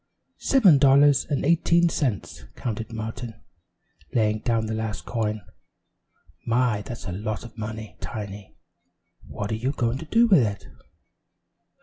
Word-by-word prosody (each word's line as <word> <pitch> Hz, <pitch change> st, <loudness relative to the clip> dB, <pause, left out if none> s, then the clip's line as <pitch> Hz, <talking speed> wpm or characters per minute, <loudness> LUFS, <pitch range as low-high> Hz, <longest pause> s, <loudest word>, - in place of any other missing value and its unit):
"Seven 195 Hz, -, +5 dB
dollars 140 Hz, +1 st, +5 dB
and 145 Hz, -3 st, -1 dB
eighteen 170 Hz, +2 st, +3 dB
cents," 130 Hz, -, -2 dB
counted 115 Hz, -1 st, -4 dB
Martin, 115 Hz, +1 st, -6 dB, 0.8 s
laying 110 Hz, -2 st, +2 dB
down 115 Hz, -1 st, 0 dB
the 110 Hz, -, -3 dB
last 110 Hz, -1 st, -4 dB
coin. 110 Hz, -2 st, -2 dB, 1.0 s
"My! 120 Hz, -2 st, +1 dB
that's 115 Hz, +2 st, -8 dB
a 90 Hz, -, -4 dB
lot 105 Hz, +3 st, -4 dB
of 115 Hz, -, -12 dB
money, 110 Hz, -1 st, -7 dB
Tiny. 105 Hz, -3 st, -7 dB, 0.7 s
What 100 Hz, +1 st, -5 dB
are -, -, 0 dB
you 120 Hz, +5 st, -1 dB
going 120 Hz, -1 st, -1 dB
to 160 Hz, -, -7 dB
do 230 Hz, +8 st, +4 dB
with 190 Hz, -, +6 dB
it?" 105 Hz, -4 st, -2 dB
115 Hz, 135 wpm, -25 LUFS, 110-135 Hz, 1.0 s, with